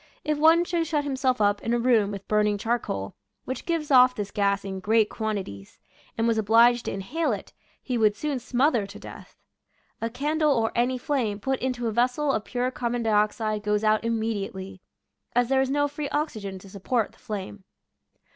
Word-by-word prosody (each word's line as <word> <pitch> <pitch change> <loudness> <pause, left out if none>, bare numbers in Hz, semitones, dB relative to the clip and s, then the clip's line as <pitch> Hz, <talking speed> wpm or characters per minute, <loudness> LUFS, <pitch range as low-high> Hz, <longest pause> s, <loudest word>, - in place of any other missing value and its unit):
If 305 -1 -1
one 325 +3 +6
should 340 -2 -1
shut 300 -2 0
himself 265 -3 0
up 205 -1 +2
in 230 +1 0
a - - +2
room 230 -4 +3
with 200 -1 -7
burning 210 -1 +2
charcoal, 200 - -2 0.3
which 260 - -5
gives 325 -4 -1
off 255 -1 +6
this 205 -1 -4
gas 200 -1 0
in 190 -1 -4
great 215 +2 +2
quantities, 195 - -5 0.4
and 230 0 +1
was 225 -1 +2
obliged 230 +3 +4
to - - -2
inhale 250 +13 -2
it, - - -5 0.3
he 250 -3 -2
would 210 -2 +3
soon 285 +4 -2
smother 245 -3 +1
to 200 - -11
death. - - -12 0.6
A 230 - -1
candle 300 +4 +1
or 225 -3 +1
any 245 +2 +1
flame 245 -6 -1
put 265 +4 -1
into 250 -1 -2
a 225 - 0
vessel 250 +6 +1
of 215 -5 -2
pure 250 0 -1
carbon 240 -1 -2
dioxide 215 0 +1
goes 210 0 0
out 215 0 +3
immedi 225 -3 -2
ately, 190 0 -9 0.6
as 245 0 +2
there 265 0 +3
is 265 - 0
no 290 +1 +2
free 290 0 -5
oxygen 220 -11 -3
to 190 - -13
support 215 +3 -1
the - - -24
flame. 205 -1 -6
230 Hz, 195 wpm, -26 LUFS, 210-265 Hz, 0.6 s, one